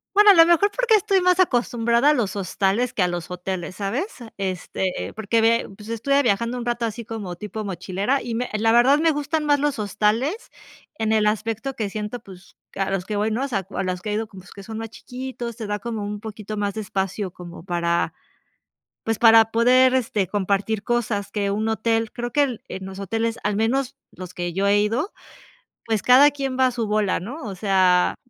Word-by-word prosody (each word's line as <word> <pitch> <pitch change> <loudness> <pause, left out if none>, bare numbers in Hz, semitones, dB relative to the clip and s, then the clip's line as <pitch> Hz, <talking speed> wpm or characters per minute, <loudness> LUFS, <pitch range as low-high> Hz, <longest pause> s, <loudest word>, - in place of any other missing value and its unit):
Bueno, 415 0 +8
a 395 - +8
lo 330 -1 +8
mejor 345 +4 +4
porque - - +2
estoy 390 -1 +2
más 365 0 +3
acostumbrada 240 -4 +2
a - - +4
los 215 -8 -1
hostales 200 +5 0
que 190 - 0
a 180 - +3
los 175 0 -5
hoteles, 180 0 -5
¿sabes? 225 - -2 0.3
Este, 185 -1 -3
porque 220 +2 0
ve, 230 +1 +2
pues, 210 +1 -12
estuve 275 +5 +1
viajando 235 +1 0
un 240 - -5
rato 240 -1 0
así 230 +1 -5
como 205 -6 -6
tipo 210 +3 -6
mochilera 200 +7 -1
y 235 - -4
me 245 +2 -2
la 225 +1 +2
verdad, 250 +5 +5
me 320 0 +3
gustan 295 +2 -2
más 290 -1 +3
los 290 -4 0
hostales 220 - -1 0.5
en 220 0 0
el 215 -1 +3
aspecto 225 +4 -1
que 215 -3 -2
siento, 215 +3 -5
pues, 190 -4 -15 0.2
que - - -8
a 195 - 0
los 195 -2 -1
que 210 +2 -4
voy, 210 +2 0
¿no? 240 +5 -1
O - - -3
sea, 195 -7 -2
a - - -2
los 180 -1 -2
que 210 - -5
he - - -1
ido 220 +1 -1
como 195 -3 -13
que 200 - -10
son 220 +2 -7
más 225 -1 -6
chiquitos, 250 -2 -7
te 225 - -6
da 205 0 -2
como 225 0 -5
un 205 0 -5
poquito 215 -1 -7
más 205 -1 -2
de 220 - -4
espacio 195 -1 -3
como 175 -2 -11
para, 170 -1 0 0.9
pues, 225 -1 -1
para 225 -1 +6
poder, 255 +3 +5
este, 220 -6 0
compartir 200 +2 -1
cosas 215 -3 -1
que 200 -2 -1
un 215 +2 -1
hotel, 225 0 0
creo 240 0 -4
que 290 - +3
el, 255 -6 -2
en 190 0 -6
los 190 0 -8
hoteles, 225 +4 -2
al 205 -1 0
menos 255 +4 0 0.2
los 180 -1 -10
que 175 -1 -3
yo 195 +3 0
he 200 +1 +4
ido, 235 - -1 0.7
pues 220 -3 0
cada 270 +4 +7
quien 270 -2 -3
va 260 0 +4
a 255 - -1
su 230 -3 -3
bola, 210 -2 +1
¿no? 250 - -7
O 200 -4 -5
sea, 185 -2 +3
220 Hz, 220 wpm, -23 LUFS, 200-245 Hz, 0.9 s, Bueno